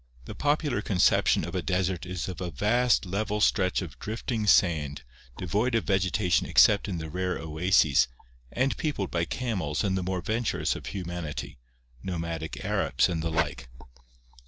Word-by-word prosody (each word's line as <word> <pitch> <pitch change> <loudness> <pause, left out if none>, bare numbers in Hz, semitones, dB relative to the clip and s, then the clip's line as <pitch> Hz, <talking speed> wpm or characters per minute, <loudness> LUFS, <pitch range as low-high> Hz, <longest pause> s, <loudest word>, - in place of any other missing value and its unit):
— - - -24
The - - -7
popular 145 -5 0
conception 95 -4 +3
of - - -7
a - - -1
desert 90 -1 -1
is 90 -2 -4
of 95 0 -6
a 90 - -3
vast 110 - +2
level 105 +3 -2
stretch 95 -2 +2
of 70 -8 -10
drifting 110 0 -3
sand, 75 -8 +3 0.3
devoid 105 +8 0
of 115 - +1
vegeta 95 -1 0
tion - - +3
except 105 0 +5
in 95 -4 -3
the 80 -1 -5
rare 90 +3 -2
oases, 80 -4 +3 0.4
and 130 +2 0
peopled 145 - -2
by 85 -1 0
camels 90 - -2
and 95 -2 0
the 95 - -1
more 90 0 -2
venturous 115 +3 -1
of - - -8
humanity 85 -8 -5 0.2
— - - -31
nomadic 80 -7 -4
Arabs - - +1
and 80 -2 -2
the 80 - -2
like. 80 -7 -2
90 Hz, 170 wpm, -27 LUFS, 80-105 Hz, 0.4 s, except